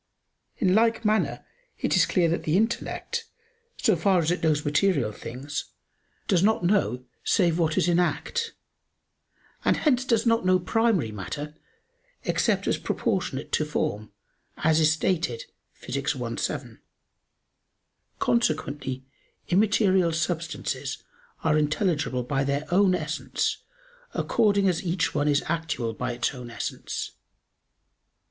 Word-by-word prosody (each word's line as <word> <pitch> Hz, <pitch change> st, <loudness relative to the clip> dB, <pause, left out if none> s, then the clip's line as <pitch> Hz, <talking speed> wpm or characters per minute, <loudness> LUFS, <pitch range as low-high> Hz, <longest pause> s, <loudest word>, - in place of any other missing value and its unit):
In 185 Hz, -5 st, +2 dB
like 225 Hz, +1 st, +3 dB
manner 215 Hz, +1 st, +1 dB, 0.3 s
it -, -, 0 dB
is -, -, +4 dB
clear 175 Hz, -3 st, +2 dB
that 170 Hz, -, 0 dB
the 155 Hz, +3 st, +1 dB
intellect, 235 Hz, -, -1 dB, 0.5 s
so 220 Hz, -5 st, +3 dB
far 185 Hz, +3 st, +3 dB
as 165 Hz, 0 st, +1 dB
it 180 Hz, -, -1 dB
knows 155 Hz, -2 st, +1 dB
material 145 Hz, -, +2 dB
things, 130 Hz, +7 st, -6 dB, 0.6 s
does 185 Hz, -5 st, +3 dB
not 210 Hz, -2 st, +3 dB
know 130 Hz, -, +1 dB, 0.2 s
save 175 Hz, -3 st, +2 dB
what 160 Hz, -2 st, +1 dB
is -, -, +3 dB
in 175 Hz, 0 st, +3 dB
act: 460 Hz, -, -1 dB, 1.1 s
and -, -, +3 dB
hence 255 Hz, -5 st, +2 dB
it -, -, -15 dB
does 230 Hz, -1 st, +3 dB
not 230 Hz, -2 st, +3 dB
know 185 Hz, 0 st, +4 dB
primary 190 Hz, -, +1 dB
matter 145 Hz, +9 st, -5 dB, 0.7 s
except -, -, +1 dB
as -, -, 0 dB
proportionate 185 Hz, -, -2 dB
to -, -, +2 dB
form, 110 Hz, -8 st, -2 dB, 0.5 s
as 160 Hz, 0 st, +4 dB
is 155 Hz, -1 st, +5 dB
stated 180 Hz, -, 0 dB, 0.3 s
Phys. -, -, -2 dB
i, -, -, -3 dB
7. -, -, -4 dB, 1.4 s
Consequently 140 Hz, -, 0 dB, 0.4 s
immaterial 190 Hz, -2 st, +3 dB
substances 165 Hz, 0 st, -3 dB, 0.4 s
are 155 Hz, -1 st, +3 dB
intelligible 150 Hz, -4 st, 0 dB
by 135 Hz, +2 st, 0 dB
their 140 Hz, +2 st, -1 dB
own 190 Hz, -1 st, +5 dB
essence 155 Hz, -1 st, -2 dB, 0.6 s
according 200 Hz, -3 st, +2 dB
as 180 Hz, -2 st, 0 dB
each 180 Hz, +1 st, 0 dB
one 145 Hz, 0 st, +1 dB
is 145 Hz, -1 st, +3 dB
actual 155 Hz, -8 st, -2 dB
by 125 Hz, +2 st, -3 dB
its 120 Hz, +2 st, -1 dB
own 125 Hz, -2 st, -8 dB
essence. 115 Hz, -, -4 dB
170 Hz, 130 wpm, -26 LUFS, 145-200 Hz, 1.4 s, is